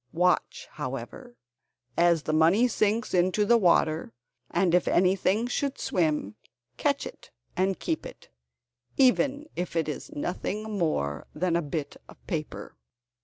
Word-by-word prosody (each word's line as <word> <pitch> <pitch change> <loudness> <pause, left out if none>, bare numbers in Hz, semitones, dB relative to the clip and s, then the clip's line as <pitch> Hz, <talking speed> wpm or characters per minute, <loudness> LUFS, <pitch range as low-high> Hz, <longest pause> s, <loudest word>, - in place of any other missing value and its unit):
Watch, 180 +2 +1
however, 135 - -7 0.6
as 170 -2 +3
the 155 - -2
money 170 +10 +4
sinks 215 0 0
into 185 +3 +2
the 235 - +5
water, 160 - +2 0.4
and 175 -1 +1
if 180 - +3
anything 190 +4 +2
should 270 +3 -2
swim, 150 - 0 0.4
catch 280 - 0
it - - -11 0.3
and 190 +1 +1
keep 160 - -2
it, - - -14 0.7
even 275 +2 +3
if 180 -1 -4
it 165 -2 +1
is 150 -4 -5
nothing 185 +7 -3
more 75 - -1
than 180 -2 0
a 170 - +2
bit 145 -1 -4
of - - -14
paper." 155 -5 -5
175 Hz, 135 wpm, -27 LUFS, 155-210 Hz, 0.7 s, the